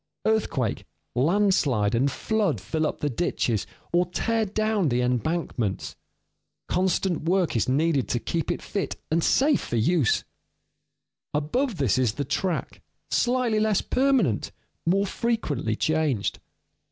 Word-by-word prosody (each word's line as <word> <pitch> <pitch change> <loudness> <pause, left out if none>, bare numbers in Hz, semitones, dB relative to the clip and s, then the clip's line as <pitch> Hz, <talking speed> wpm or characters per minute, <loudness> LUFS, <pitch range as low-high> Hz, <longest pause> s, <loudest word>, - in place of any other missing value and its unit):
Earthquake, 205 - 0 0.3
landslide, 140 - +2
and 135 +4 +2
flood 205 - 0
fill 155 - -1
up - - -5
the 145 - +1
ditches, 115 - -1 0.3
or 175 +1 +3
tear 225 +5 0
down 215 -3 0
the 120 0 +1
embankments. 125 - -1 0.7
Constant 185 -1 +1
work 180 -3 +1
is 115 +1 +1
needed 145 0 +2
to - - +1
keep 165 +6 -2
it - - -4
fit 200 - -3 0.2
and 165 +1 +2
safe 285 +1 +3
for - - -4
use. 130 +3 +2 1.1
Above 210 - 0
this 130 - +2
is 120 -5 +2
the 140 +3 -3
track, 165 +6 -2 0.3
slightly 245 -3 +2
less 215 -2 +2
permanent, 255 - +1 0.4
more 195 +3 +3
frequently 190 - -1
changed. 155 -6 0
165 Hz, 130 wpm, -25 LUFS, 125-205 Hz, 1.1 s, or